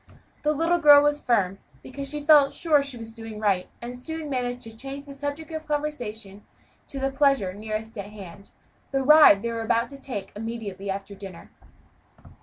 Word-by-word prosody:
The 300 Hz, -, +1 dB
little 330 Hz, +3 st, +1 dB
girl 290 Hz, -2 st, +8 dB
was 295 Hz, 0 st, +1 dB
firm, 195 Hz, -5 st, +1 dB, 0.2 s
because 275 Hz, +1 st, -6 dB
she 295 Hz, 0 st, -5 dB
felt 295 Hz, -3 st, +6 dB
sure 305 Hz, -4 st, +3 dB
she 275 Hz, -3 st, -6 dB
was 225 Hz, -1 st, -9 dB
doing 225 Hz, -2 st, -9 dB
right, 195 Hz, -4 st, 0 dB
and 245 Hz, +1 st, -6 dB
soon 315 Hz, +3 st, -6 dB
managed 245 Hz, -1 st, -2 dB
to 225 Hz, -2 st, -10 dB
change 275 Hz, +4 st, -7 dB
the 280 Hz, -, -10 dB
subject 285 Hz, +3 st, -5 dB
of 315 Hz, -1 st, -6 dB
conversation 235 Hz, -9 st, -4 dB, 0.4 s
to 275 Hz, -, -8 dB
the 270 Hz, 0 st, -1 dB
pleasure 270 Hz, -9 st, +2 dB
nearest 215 Hz, +2 st, -5 dB
at 200 Hz, -, -4 dB
hand 200 Hz, -2 st, -11 dB, 0.4 s
the 270 Hz, -1 st, 0 dB
ride 300 Hz, -8 st, +7 dB
they 235 Hz, -, -1 dB
were 225 Hz, -1 st, -4 dB
to 240 Hz, +5 st, 0 dB
take 205 Hz, -7 st, -6 dB
immediately 210 Hz, -3 st, -6 dB
after 195 Hz, +1 st, -4 dB
dinner. 195 Hz, -3 st, -11 dB
245 Hz, 180 wpm, -25 LUFS, 210-290 Hz, 0.4 s, girl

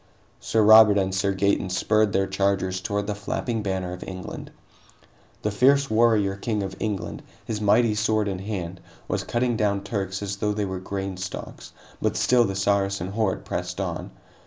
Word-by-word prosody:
Sir 110 Hz, -, +1 dB
Robert 110 Hz, -1 st, +8 dB
and 95 Hz, -1 st, 0 dB
Sir 100 Hz, +1 st, +1 dB
Gaeton 100 Hz, 0 st, +1 dB
spurred 105 Hz, +3 st, +2 dB
their 95 Hz, 0 st, +2 dB
chargers 95 Hz, -1 st, 0 dB
toward 100 Hz, 0 st, -2 dB
the 105 Hz, -, -2 dB
flapping 110 Hz, +3 st, -3 dB
banner 95 Hz, -3 st, -2 dB
of 90 Hz, -, -7 dB
England. 95 Hz, 0 st, -7 dB, 0.9 s
The 105 Hz, -, 0 dB
fierce 135 Hz, +5 st, +3 dB
warrior 110 Hz, -3 st, +3 dB
king 105 Hz, 0 st, -2 dB
of 95 Hz, -, -5 dB
England, 105 Hz, -4 st, -3 dB, 0.2 s
his 105 Hz, -2 st, -3 dB
mighty 105 Hz, +2 st, +4 dB
sword 110 Hz, 0 st, +1 dB
in 95 Hz, -2 st, -3 dB
hand, 95 Hz, -3 st, -5 dB, 0.3 s
was -, -, -1 dB
cutting 120 Hz, 0 st, 0 dB
down 100 Hz, -2 st, 0 dB
Turks 100 Hz, -1 st, -3 dB
as 100 Hz, -1 st, -4 dB
though 105 Hz, +1 st, 0 dB
they 105 Hz, 0 st, -1 dB
were 95 Hz, -1 st, -4 dB
grain 95 Hz, 0 st, -4 dB
stalks, 95 Hz, 0 st, -7 dB, 0.3 s
but -, -, 0 dB
still 125 Hz, -1 st, +4 dB
the 95 Hz, -, -3 dB
Saracen 100 Hz, -1 st, 0 dB
horde 105 Hz, -2 st, -1 dB
pressed -, -, -4 dB
on. -, -, -3 dB
100 Hz, 175 wpm, -25 LUFS, 95-110 Hz, 0.9 s, Robert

